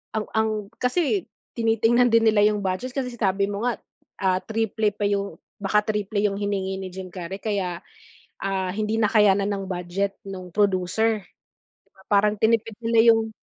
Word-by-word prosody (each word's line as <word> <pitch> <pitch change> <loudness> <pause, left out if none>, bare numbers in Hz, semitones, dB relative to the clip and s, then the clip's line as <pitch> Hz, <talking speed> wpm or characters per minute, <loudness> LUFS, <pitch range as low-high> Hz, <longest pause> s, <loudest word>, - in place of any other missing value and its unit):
Ang 220 -1 -1
ang, 220 0 +2 0.3
kasi 345 +9 0 0.3
tinitingnan 230 +1 +3
din 225 0 +5
nila 210 -1 +4
yung 210 0 +3
budget 195 +6 -2
kasi 260 0 -2
sinabi 200 -3 +1
mo 205 +2 -4
nga, 245 -2 0 0.4
ah, 185 -1 +2
triple 220 0 0
pa 205 0 -1
yung 200 -4 -2 0.2
baka 205 +1 +3
triple 210 0 -2
yung 205 -1 +1
hiningi 200 -1 -2
ni 190 -1 -6
Jim 190 0 -7
Carrey 185 +1 -7
kaya, 190 -5 -2 0.6
ah, 190 -1 -1
hindi 215 +2 -1
nakayanan 210 -3 +3
ng 195 -1 -3
budget 185 +2 -2
nung 190 -2 -7
producer, 205 +3 +1 0.9
parang 210 +1 +3
tinipid 225 0 +1
nila 230 0 +4
yung 225 0 -1
205 Hz, 155 wpm, -24 LUFS, 195-225 Hz, 0.9 s, din